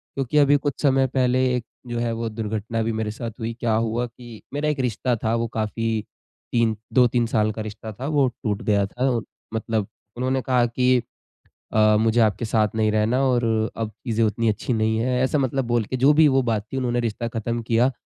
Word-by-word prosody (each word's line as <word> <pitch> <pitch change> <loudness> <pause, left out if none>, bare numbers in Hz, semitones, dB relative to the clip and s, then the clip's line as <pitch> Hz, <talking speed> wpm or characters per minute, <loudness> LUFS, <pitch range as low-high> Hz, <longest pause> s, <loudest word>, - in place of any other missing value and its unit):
क्योंकि 135 +2 -1
अभी 145 0 +6
कुछ 145 -1 -2
समय 135 -2 +3
पहले 130 0 +2
एक 120 -2 -3 0.2
जो 120 -1 -3
है 120 0 0
वो 115 0 -3
दुर्घटना 110 +1 -3
भी 115 - -1
मेरे 110 -1 -2
साथ 115 +1 -5
हुई, 115 +1 -3
क्या 115 -2 +1
हुआ 115 +2 0
कि 120 -1 -12
मेरा 150 +1 0
एक 150 -2 -2
रिश्ता 125 0 0
था 110 +1 +1
वो 115 0 0
काफ़ी 110 0 -2 0.5
3, 115 -2 +2 0.2
2-3 125 -2 +4
साल 110 -1 +1
का 110 - -6
रिश्ता 110 +1 -7
था 130 +7 -6
वो 145 -3 +3 0.2
टूट 105 -3 -1
गया 100 -2 +2
था 125 +7 -1
और 115 -2 -1 0.3
मतलब 110 -2 -1 0.3
उन्होंने 130 +1 0
कहा 125 -2 +2
कि 125 +1 +2 0.7
अ, 110 -1 +5
मुझे 115 +1 +3
आपके 110 +1 +1
साथ 110 -1 +2
नहीं 110 -1 +2
रहना 110 +4 +2
और 125 -2 +2 0.3
अब 115 -2 -2
चीजें 115 +1 -2
उतनी 110 +1 +1
अच्छी 110 +4 -1
नहीं 110 0 +1
है, 125 +2 +1
ऐसा 130 +3 +1
मतलब 135 -1 0
बोल 120 -2 +1
के 130 - -3
जो 135 +4 +5
भी 155 +1 +6
वो 135 -1 +3
बात 110 -3 -1
थी - - -1
उन्होंने 120 -2 0
रिश्ता 115 0 -2
ख़त्म 115 +1 -3
किया। 115 +3 +2
115 Hz, 215 wpm, -23 LUFS, 110-125 Hz, 0.7 s, अभी